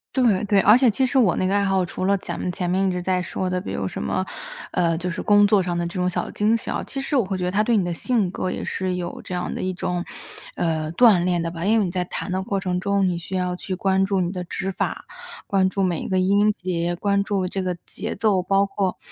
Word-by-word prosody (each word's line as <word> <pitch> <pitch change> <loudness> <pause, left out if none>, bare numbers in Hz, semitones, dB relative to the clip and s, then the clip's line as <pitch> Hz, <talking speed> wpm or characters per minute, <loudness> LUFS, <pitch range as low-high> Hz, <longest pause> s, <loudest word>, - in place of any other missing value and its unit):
对， 230 -8 +3
对， 200 -1 +3
而 210 +3 +7
且 255 0 +5
其 260 +5 +1
实 265 +1 +2
我 200 -9 +4
那 - - 0
个 190 - +1
爱 200 0 +2
好， 190 -2 +2
除 175 - -5
了 200 +1 +3
咱们 180 -1 -4
前 180 0 -3
面 185 +2 +1
一 - - +1
直 180 - -2
在 180 0 0
说 185 +1 -3
的， 180 0 -1
比 - - -6
如 - - -2
什 - - -5
么， - - -1 0.5
呃， 165 -2 +1
就 180 +2 -3
是 - - -4
工 205 0 +5
作 205 -1 +4
上 175 -1 -2
的 175 - -1
这 170 - -5
种 180 0 +1
小 180 - -3
惊 215 +2 +2
喜 - - -5
啊， - - -2
其 275 - -5
实 275 +2 -2
我 255 - +4
会 190 -1 -3
觉 180 - -2
得 180 - -1
它 205 +3 +2
对 230 0 +2
你 190 - +1
的 175 - -2
性 215 +1 0
格 185 - -3
也 - - -4
是 185 -1 -2
有 175 -1 -5
这 180 - -5
样 180 - -3
的 - - -4
一 185 - -1
种， 180 -1 -2 0.5
呃， 155 -2 -1
锻 205 -4 +5
炼 180 -1 +1
的 165 0 -2
吧。 165 -1 -6
因 215 +4 +3
为 210 - +2
你 175 - -3
在 180 0 -1
弹 180 - -5
的 185 +1 0
过 195 +1 -2
程 180 -2 -1
中， 200 0 +1
你 175 -2 -1
需 180 +2 -6
要 180 -1 -1
去 185 +1 -4
关 190 +1 +2
注 195 0 +1
你 175 -1 0
的 180 -2 -4
指 185 +2 -3
法， - - -3 0.4
关 190 -1 +2
注 195 +1 -1
每 175 -3 0
一 - - -5
个 190 - 0
音 200 +3 +3
节， 175 -2 -2
关 200 +2 +1
注 200 -2 -1
这 190 +1 -3
个 180 -2 -2
节 215 +3 -5
奏， 205 -4 +2
包 195 +2 +2
括 195 -1 -2
185 Hz, 310 characters per minute, -23 LUFS, 180-200 Hz, 0.5 s, 而